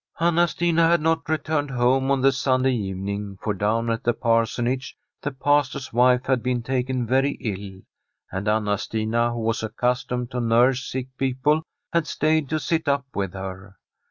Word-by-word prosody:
Anna 170 +1 +3
Stina 170 0 +2
had 170 +1 +4
not 160 +1 0
returned 155 -1 0
home 130 +1 +2
on 135 -1 +2
the 135 +1 +5
Sun 130 -1 +1
day 130 - +3
evening, 100 -2 -3
for 105 - -1
down 110 +4 0
at 115 - -2
the 120 - +2
Parsonage 120 +3 0 0.2
the - - -2
Pas 145 0 +2
tor's 130 -2 -7
wife 125 +1 +4
had 130 -2 +1
been 125 -1 -1
taken 130 0 -1
very 135 +4 +2
ill, 100 -3 -6 0.5
and 95 +2 -4
Anna 105 -2 +1
Stina, 115 +2 0
who 120 -1 -4
was 115 0 0
accustomed 125 +2 -2
to 125 - -2
nurse 120 +3 +3
sick 130 0 -4
people, 135 +4 +1 0.3
had 170 -2 +1
stayed 155 -2 +1
to 155 - 0
sit 160 +1 -1
up 140 -1 +1
with 95 -2 -2
her. 95 +1 -7
125 Hz, 180 wpm, -24 LUFS, 110-140 Hz, 0.5 s, the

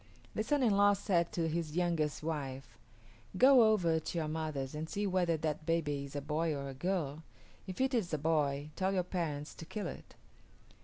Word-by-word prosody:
The - - -1
son 285 +3 +1
in 220 -5 +4
law 205 0 +6
said 180 -4 +1
to 165 -2 0
his 160 -1 -2
youngest 165 -4 0
wife, 135 -6 -4 0.6
"Go 250 -3 +7
over 170 -6 +2
to 160 - -5
your 160 -2 0
mother's 155 -4 -3
and 155 +2 -4
see 205 +1 -2
whether 180 -4 +1
that 155 0 -3
baby 145 -4 0
is 140 - -11
a 145 - -2
boy 155 +2 -1
or 140 0 -4
a - - -6
girl. 155 -1 -2 0.5
If 185 - -6
it 265 +1 +1
is 215 -8 0
a 155 - 0
boy, 145 -1 0
tell 190 +1 0
your 180 - +2
parents 160 -5 -3
to - - -10
kill 210 +5 -5
it." - - -8
165 Hz, 200 wpm, -33 LUFS, 150-185 Hz, 0.6 s, Go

